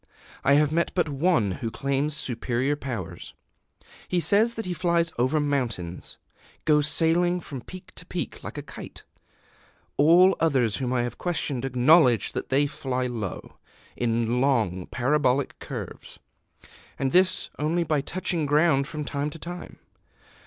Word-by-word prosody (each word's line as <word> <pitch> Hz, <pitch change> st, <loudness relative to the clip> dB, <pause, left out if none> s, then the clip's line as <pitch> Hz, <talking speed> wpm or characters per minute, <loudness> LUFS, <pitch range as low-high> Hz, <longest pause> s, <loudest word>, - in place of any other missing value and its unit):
I 140 Hz, -, +4 dB
have 150 Hz, 0 st, +3 dB
met 170 Hz, +2 st, +1 dB
but 175 Hz, -4 st, +1 dB
one 145 Hz, -, +2 dB
who 115 Hz, +5 st, -4 dB
claims 140 Hz, +5 st, -1 dB
superior 125 Hz, +1 st, -1 dB
powers: 105 Hz, -, -6 dB, 0.7 s
he 180 Hz, -, +1 dB
says 205 Hz, +8 st, +3 dB
that 225 Hz, -, -4 dB
he 180 Hz, -, -2 dB
flies 170 Hz, 0 st, +1 dB
over 130 Hz, +5 st, +2 dB
mountains 120 Hz, -, -3 dB, 0.5 s
goes 150 Hz, -1 st, +4 dB
sailing 175 Hz, +3 st, +3 dB
from 140 Hz, -6 st, -8 dB
peak 185 Hz, +8 st, -12 dB
to -, -, -7 dB
peak -, -, -5 dB
like -, -, -7 dB
a -, -, -5 dB
kite. -, -, -10 dB, 0.9 s
All 175 Hz, +6 st, +6 dB
others 130 Hz, -9 st, +2 dB
whom 125 Hz, -2 st, -2 dB
I 125 Hz, -1 st, +1 dB
have 120 Hz, -1 st, -5 dB
questioned 145 Hz, -7 st, -2 dB
acknowledge 125 Hz, -, +4 dB
that -, -, -5 dB
they 140 Hz, +2 st, +3 dB
fly 130 Hz, -3 st, -3 dB
low, 115 Hz, -7 st, -5 dB, 0.4 s
in 120 Hz, +1 st, 0 dB
long 110 Hz, -10 st, +1 dB
parabolic 130 Hz, +1 st, 0 dB
curves, -, -, -7 dB, 0.8 s
and 135 Hz, -1 st, -1 dB
this 185 Hz, +2 st, +2 dB
only 165 Hz, +4 st, +1 dB
by 155 Hz, -3 st, 0 dB
touching 175 Hz, 0 st, -2 dB
ground 145 Hz, -2 st, +3 dB
from 150 Hz, -1 st, -5 dB
time 145 Hz, +1 st, -2 dB
to 150 Hz, -, -10 dB
time. 175 Hz, +2 st, -8 dB
145 Hz, 145 wpm, -26 LUFS, 125-165 Hz, 0.9 s, All